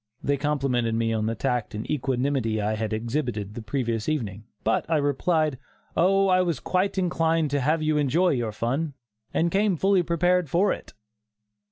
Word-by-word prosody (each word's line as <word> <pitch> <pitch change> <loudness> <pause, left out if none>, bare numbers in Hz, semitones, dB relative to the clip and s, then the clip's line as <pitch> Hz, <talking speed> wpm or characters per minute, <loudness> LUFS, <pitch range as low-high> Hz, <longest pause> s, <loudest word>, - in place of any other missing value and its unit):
They 145 - +2
complimented 135 -5 0
me 115 0 0
on 110 -1 0
the 115 - -1
tact 120 -1 -2
and 105 - -5
equanimity 130 -4 0
I 105 +1 0
had 110 0 -2
exhibited 115 -2 -2
the 115 - -6
previous 115 0 -2
evening, 110 -9 -3 0.2
but 110 - +1
I 160 - +3
replied: 150 0 +1 0.4
"Oh! 195 +3 +4
I 185 -1 +4
was 170 -7 -1
quite 190 +2 0
inclined 165 -4 +1
to 145 - +1
have 155 +4 +1
you 155 0 +2
enjoy 155 +6 +2
your 120 -7 0
fun, 135 +8 -2 0.4
and 170 +1 +1
came 195 -1 +2
fully 195 +2 +3
prepared 175 0 +1
for 180 +8 +3
it." - - -10
140 Hz, 175 wpm, -25 LUFS, 115-170 Hz, 0.4 s, Oh